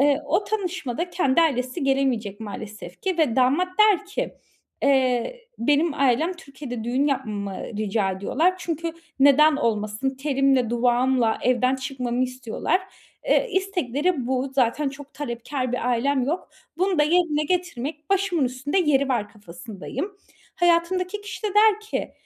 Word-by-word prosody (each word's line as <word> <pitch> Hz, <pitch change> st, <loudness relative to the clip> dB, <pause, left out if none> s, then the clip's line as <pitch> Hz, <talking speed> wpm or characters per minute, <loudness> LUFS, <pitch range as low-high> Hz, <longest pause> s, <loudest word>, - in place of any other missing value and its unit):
Eee, 285 Hz, +1 st, +4 dB
o 400 Hz, -, +1 dB
tanışmada 360 Hz, -, -3 dB
kendi 335 Hz, -4 st, +2 dB
ailesi 265 Hz, -1 st, 0 dB
gelemeyecek 250 Hz, -7 st, 0 dB
maalesef 205 Hz, -3 st, -8 dB
ki 375 Hz, -3 st, -1 dB
ve 270 Hz, -7 st, +2 dB
damat 275 Hz, +8 st, +3 dB
der 420 Hz, -2 st, +5 dB
ki 425 Hz, +5 st, -3 dB, 0.5 s
"Eee, 265 Hz, -, +2 dB, 0.2 s
benim 295 Hz, +5 st, +2 dB
ailem 280 Hz, +5 st, +2 dB
Türkiye'de 270 Hz, -7 st, -8 dB
düğün 255 Hz, +4 st, +1 dB
yapmamı 215 Hz, -8 st, -2 dB
ı 205 Hz, -, -7 dB
rica 210 Hz, -2 st, 0 dB
ediyorlar 275 Hz, -, +1 dB
çünkü 330 Hz, -1 st, -3 dB, 0.3 s
neden 285 Hz, +2 st, +6 dB
olmasın, 215 Hz, -1 st, -1 dB
telimle 270 Hz, -3 st, +1 dB
duvağımla 245 Hz, 0 st, +2 dB
evden 255 Hz, +1 st, +2 dB
çıkmamı 255 Hz, -2 st, -2 dB
istiyorlar." 255 Hz, +7 st, -1 dB, 0.5 s
Eee, -, -, +3 dB
istekleri 355 Hz, -, 0 dB
bu; 260 Hz, +1 st, 0 dB
zaten 270 Hz, +3 st, +2 dB
çok 280 Hz, +1 st, -11 dB
talepkâr 255 Hz, -1 st, -4 dB
bir 250 Hz, -1 st, -1 dB
ailem 260 Hz, +3 st, +1 dB
yok. 320 Hz, +7 st, -3 dB, 0.3 s
Bunu 370 Hz, -2 st, +1 dB
da -, -, +6 dB
yerine 305 Hz, -2 st, +2 dB
getirmek 310 Hz, -3 st, -3 dB
başımın 380 Hz, -7 st, +2 dB
üstünde 255 Hz, +7 st, -1 dB
yeri 280 Hz, -6 st, +2 dB
var 225 Hz, -5 st, 0 dB
kafasındayım. 205 Hz, -, -7 dB, 0.4 s
Hayatımdaki 360 Hz, +3 st, +1 dB
kişi 385 Hz, -2 st, -8 dB
de 425 Hz, -, 0 dB
der 425 Hz, 0 st, +5 dB
ki 430 Hz, -, -4 dB
275 Hz, 140 wpm, -24 LUFS, 245-340 Hz, 0.5 s, neden